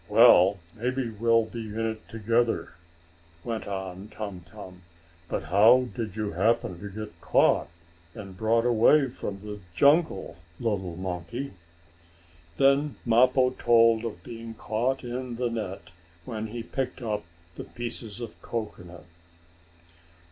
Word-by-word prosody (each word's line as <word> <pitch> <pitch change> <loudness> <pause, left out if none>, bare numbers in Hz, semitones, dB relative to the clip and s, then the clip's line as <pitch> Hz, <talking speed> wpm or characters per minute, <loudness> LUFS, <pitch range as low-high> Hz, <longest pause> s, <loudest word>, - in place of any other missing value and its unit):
"Well, 100 -3 +7 0.2
maybe 125 +1 -2
we'll 115 +1 +3
be 115 0 -7
in 110 +2 -3
it 110 -1 -5
together," 115 +1 0 0.7
went 115 -2 -4
on 95 0 -5
Tum 105 -4 -6
Tum. 90 +1 -11 0.5
"But - - -2
how 115 +7 +5
did 110 -5 -4
you 105 -2 -2
happen 95 -1 +1
to 100 - -7
get 105 +2 -8
caught, - - +3 0.5
and 95 -3 -9
brought 115 +3 +2
away 125 +4 +4
from 100 -4 -6
the 105 0 -7 0.2
jungle, 145 - +3 0.2
little 95 -7 -2
monkey?" 95 +8 -5 1.0
Then 140 +1 +3
Mappo 125 +2 +4
told 115 -2 +4
of 105 -7 -6
being 115 -1 -8
caught 120 +6 -1
in 125 0 -4
the 120 0 -1
net 105 -6 -5 0.3
when 110 -2 -4
he 115 +2 -6
picked 130 +1 -4
up 105 -2 -2 0.3
the - - -7
pieces 120 -2 -5
of 120 - -8
cocoanut. 90 -7 -6
115 Hz, 130 wpm, -27 LUFS, 100-120 Hz, 1.0 s, Well